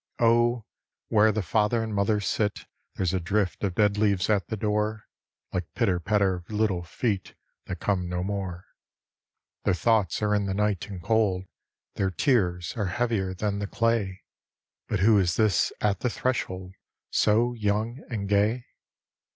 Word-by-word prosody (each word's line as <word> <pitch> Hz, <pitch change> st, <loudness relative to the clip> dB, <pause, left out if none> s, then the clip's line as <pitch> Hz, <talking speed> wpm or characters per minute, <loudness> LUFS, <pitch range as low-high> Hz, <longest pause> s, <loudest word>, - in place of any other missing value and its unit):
Oh, 120 Hz, 0 st, +3 dB, 0.4 s
where 110 Hz, 0 st, +5 dB
the 105 Hz, -1 st, -1 dB
father 110 Hz, +5 st, +1 dB
and 110 Hz, -1 st, -4 dB
mother 105 Hz, +1 st, +2 dB
sit 105 Hz, +1 st, -1 dB, 0.3 s
There's 95 Hz, -2 st, 0 dB
a 95 Hz, -, +1 dB
drift 95 Hz, +3 st, -1 dB
of 95 Hz, -3 st, -1 dB
dead 105 Hz, -1 st, +2 dB
leaves 100 Hz, -2 st, +2 dB
at 100 Hz, -5 st, +1 dB
the 110 Hz, -, -3 dB
door 105 Hz, +1 st, -1 dB, 0.5 s
Like 90 Hz, -3 st, -3 dB
pitter 95 Hz, -7 st, +2 dB
patter 100 Hz, +1 st, +2 dB
of 90 Hz, 0 st, -13 dB
little 105 Hz, -4 st, 0 dB
feet 95 Hz, +3 st, -3 dB, 0.3 s
That 90 Hz, -2 st, -5 dB
come 90 Hz, -3 st, 0 dB
no 90 Hz, 0 st, -2 dB
more. 95 Hz, -3 st, -4 dB, 1.0 s
Their 95 Hz, -, +2 dB
thoughts 105 Hz, -2 st, +2 dB
arc 105 Hz, 0 st, +2 dB
in 100 Hz, -1 st, -1 dB
the 95 Hz, -, -1 dB
night 105 Hz, -2 st, 0 dB
and 95 Hz, -4 st, -8 dB
cold. 105 Hz, -4 st, +2 dB, 0.5 s
Their 95 Hz, -, +1 dB
tears 90 Hz, -, +1 dB
arc 105 Hz, -5 st, -1 dB
heavier 105 Hz, -6 st, 0 dB
than 100 Hz, +1 st, -1 dB
the 100 Hz, -, -3 dB
clay. 115 Hz, -5 st, 0 dB, 0.6 s
But -, -, -1 dB
who 105 Hz, +1 st, +6 dB
is 85 Hz, -3 st, +1 dB
this 110 Hz, -3 st, +2 dB
at 100 Hz, -3 st, +1 dB
the 125 Hz, -, 0 dB
threshold 95 Hz, -7 st, -2 dB, 0.2 s
' -, -, -61 dB
So 115 Hz, +3 st, +3 dB
young 110 Hz, +3 st, -1 dB
and 105 Hz, -5 st, -3 dB
gay? 105 Hz, +4 st, +2 dB
105 Hz, 165 wpm, -26 LUFS, 95-110 Hz, 1.0 s, who